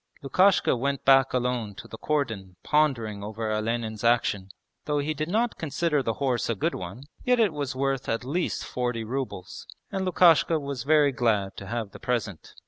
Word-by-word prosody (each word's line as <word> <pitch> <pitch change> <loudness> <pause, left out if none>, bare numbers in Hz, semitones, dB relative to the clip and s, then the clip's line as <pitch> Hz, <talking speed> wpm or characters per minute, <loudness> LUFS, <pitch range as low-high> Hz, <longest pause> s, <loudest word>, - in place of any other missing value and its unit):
Lukashka 185 +7 +4
went 140 +2 -2
back 135 0 +6
alone 125 -5 -1
to - - -10
the 110 - -10
cordon 110 -11 -2
pondering 120 -9 +1
over 110 +1 -4
Olenin's 110 0 -2
action. 115 -5 +2 0.4
Though 150 -1 0
he 145 +2 0
did 155 +2 -3
not 225 +4 0
consider 155 -1 0
the 115 -3 -1
horse 130 -5 -1
a 115 - +1
good 95 - -1
one, 95 +8 -7 0.2
yet 250 -1 +3
it 210 -7 +3
was 145 -3 -3
worth 135 -1 -1
at 115 +1 -1
least 160 +8 -2
forty 120 -2 -2
rubles 120 -6 -5 0.2
and 190 - -2
Lukashka 170 -3 +4
was 140 -4 -5
very 150 -1 +4
glad 110 -6 0
to 100 - -8
have 110 -2 -3
the - - -11
present. 115 -7 -3
125 Hz, 180 wpm, -26 LUFS, 110-150 Hz, 0.4 s, back